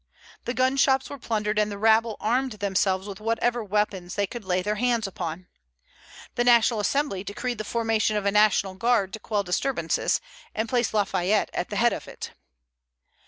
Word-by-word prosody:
The 245 - -3
gun 260 +1 +2
shops 265 -1 +2
were 285 - -7
plundered, 215 -2 -1
and 210 0 +2
the 200 - -5
rabble 220 +1 +3
armed 255 +3 0
themselves 195 -1 0
with 195 -2 -7
whatever 230 +2 0
weapons 200 -3 -1
they 205 - +1
could 235 +3 -8
lay 185 -1 0
their 210 +2 0
hands 240 -3 +1
upon. 180 -2 -5 0.9
The 240 - +1
National 235 -2 +4
Assembly 210 -2 0
decreed 225 +3 -4
the - - -2
formation 225 -1 0
of 205 - -2
a 200 - +3
national 210 -2 +3
guard 200 -1 +1
to 220 - -5
quell 210 -1 -1
disturbances, 195 +9 0 0.4
and 220 +1 -1
placed 240 -1 0
Lafayette 200 0 +1
at 180 - -3
the 205 - -5
head 235 +3 +3
of - - -6
it. - - -8
215 Hz, 180 wpm, -25 LUFS, 200-240 Hz, 0.9 s, National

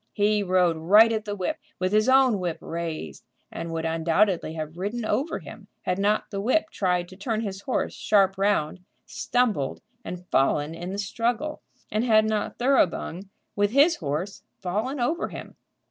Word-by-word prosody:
He 210 0 +2
rode 180 -3 +2
right 210 +8 +6
at 220 -1 -2
the 205 -1 -3
whip, 185 -3 -3 0.2
with 185 0 -1
his 215 +3 +3
own 260 -5 +5
whip 175 -3 -2
raised, 165 - -5 0.3
and 165 - -5
would 165 0 -3
undoubtedly 165 +1 +1
have 155 0 -5
ridden 215 +5 -3
over 285 +8 0
him - - -11 0.2
had 180 +1 -1
not 205 +2 +1
the 195 -1 -3
whip 315 +9 +1
tried 180 -2 0
to 185 - -12
turn 220 +3 -2
his 200 -3 -5
horse 255 - -1
sharp 195 -2 +2
round, 195 -4 0 0.3
stumbled 225 - -1 0.2
and 180 -3 -7
fallen 145 +3 +2
in 175 +2 -6
the 195 - -4
struggle, 240 +8 -2 0.3
and 215 +2 +1
had 220 -3 +4
not 215 -1 -2
Thoroughbung, 200 -7 +1 0.3
with 205 0 +2
his 290 +5 +5
horse, 160 +6 -4 0.2
fallen 215 +9 -2
over 315 +9 0
him. - - -9
200 Hz, 170 wpm, -25 LUFS, 175-225 Hz, 0.3 s, right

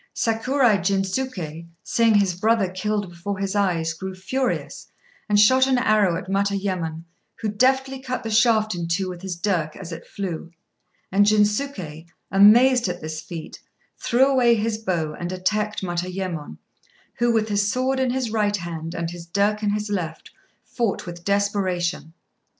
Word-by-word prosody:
Sakurai 230 0 +2
Jinsuké, 190 -3 -2 0.2
seeing 230 -2 +3
his 200 -3 +3
brother 215 +2 +2
killed 205 +2 -2
before 180 +4 -5
his 195 +1 -2
eyes, 170 -5 +1
grew 190 +3 -6
furious, 255 +7 -3 0.4
and 205 0 +4
shot 260 +5 +6
an 260 -1 +3
arrow 215 -7 +3
at - - -5
Matayémon, 190 -5 -1 0.3
who 220 -2 -3
deftly 265 +5 +1
cut 255 -1 -4
the 225 - -4
shaft 220 -1 +3
in 170 -1 -4
two 185 +3 0
with 180 -1 -8
his 190 -2 -4
dirk 170 -4 -1
as 180 -3 -8
it 165 0 -8
flew; 175 -4 -5 0.6
and 205 +2 +4
Jinsuké, 210 - 0 0.2
amazed 235 +5 +6
at 180 -1 -3
this 155 -1 -5
feat, 165 -1 -8 0.4
threw 250 +3 +3
away 255 -4 +4
his 220 0 -1
bow 170 -7 -2
and 175 0 -4
attacked 210 +3 -1
Matayémon, 175 - -4 0.6
who, 240 0 +3
with 220 -1 +1
his 205 0 +1
sword 260 +2 0
in 260 -1 +1
his 250 -2 -1
right 210 -2 +1
hand 165 -2 -6
and 170 0 -3
his 175 -1 -9
dirk 205 +4 +1
in 210 - 0
his 210 0 -2
left, 165 -5 -4 0.3
fought 235 -5 -2
with 175 -1 -8
desperation. 185 -5 -1
200 Hz, 160 wpm, -23 LUFS, 175-225 Hz, 0.6 s, shot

